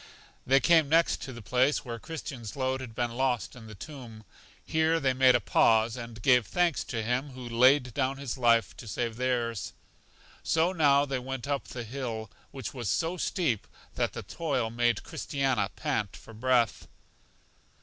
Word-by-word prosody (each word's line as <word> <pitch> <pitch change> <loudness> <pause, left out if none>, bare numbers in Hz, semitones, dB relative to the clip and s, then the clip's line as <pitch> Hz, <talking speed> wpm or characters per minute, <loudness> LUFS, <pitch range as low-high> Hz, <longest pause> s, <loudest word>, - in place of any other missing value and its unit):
They 135 - +4 0.3
next 160 +3 +2
came - - -8
to 135 - -7
the 120 -2 -10
place 125 +10 +1
where 115 -1 -5
Christian's 130 -7 -7
load 130 -1 -1
had 115 -4 -8
been 120 -1 -1
lost 125 0 -1
in 115 -3 -11
the 110 - -10
tomb. 120 -4 -10 0.4
Here 160 +1 +2
they 135 -3 +1
made 130 -1 +5
a - - +4
pause, 110 -1 +3
and 115 -3 -8
gave 125 -5 +4
thanks 175 - +1
to 115 -3 -3
Him 125 +4 -1
who 125 -1 -8
laid 125 +2 +4
down 135 +1 0
His 135 -3 -4
life 115 -3 +3
to 115 - -10
save 115 +2 -3
theirs. 120 -4 -1 0.7
So 165 +3 +2
now 145 -4 +4
they 135 -2 -2
went 130 0 -5
up 140 -1 -2
the 120 - -6
hill, 115 -3 -5 0.2
which 135 -5 -6
was 120 -6 -4
so 165 +1 0
steep 160 - -1 0.3
that - - -1
the - - -6
toil 135 -9 -2
made 120 -1 +1
Christiana 130 -8 -1
pant 125 - -2
for 115 - -13
breath. 120 -1 +1
125 Hz, 175 wpm, -29 LUFS, 115-140 Hz, 0.7 s, made